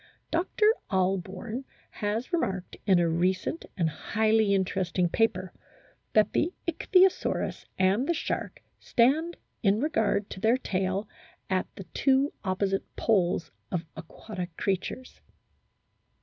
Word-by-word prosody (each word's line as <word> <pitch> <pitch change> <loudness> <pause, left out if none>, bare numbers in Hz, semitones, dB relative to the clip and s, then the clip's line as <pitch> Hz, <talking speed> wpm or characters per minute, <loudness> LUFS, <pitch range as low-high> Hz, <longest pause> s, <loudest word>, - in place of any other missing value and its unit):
Dr. 370 +6 +1 0.2
Ahlborn 195 +6 -1 0.3
has 220 - -3
remarked 190 - -1
in 190 -2 +6
a 170 -1 +3
recent 185 - 0
and 170 -3 +2
highly 215 +6 +2
interest 190 -2 -1
ing 175 -1 +3
paper 185 -3 +1
4 - - -30 0.5
that 215 -1 +4
the 335 - +2 0.2
Ichthyosaurus 365 +3 +2
and 195 +8 +2
the - - +4
shark - - -3 0.2
stand 305 +8 +2 0.2
in 205 -1 +3
regard 215 -8 +1
to - - -6
their 225 +5 +3
tail 190 -3 -1 0.4
at 185 -1 +1
the 195 - -7
two 270 +1 +3
opposite 195 0 -1
poles 185 -6 +1 0.2
of 175 -2 -2
aquatic 175 +2 -7
creatures. 195 +6 -3
200 Hz, 120 wpm, -28 LUFS, 185-245 Hz, 0.5 s, in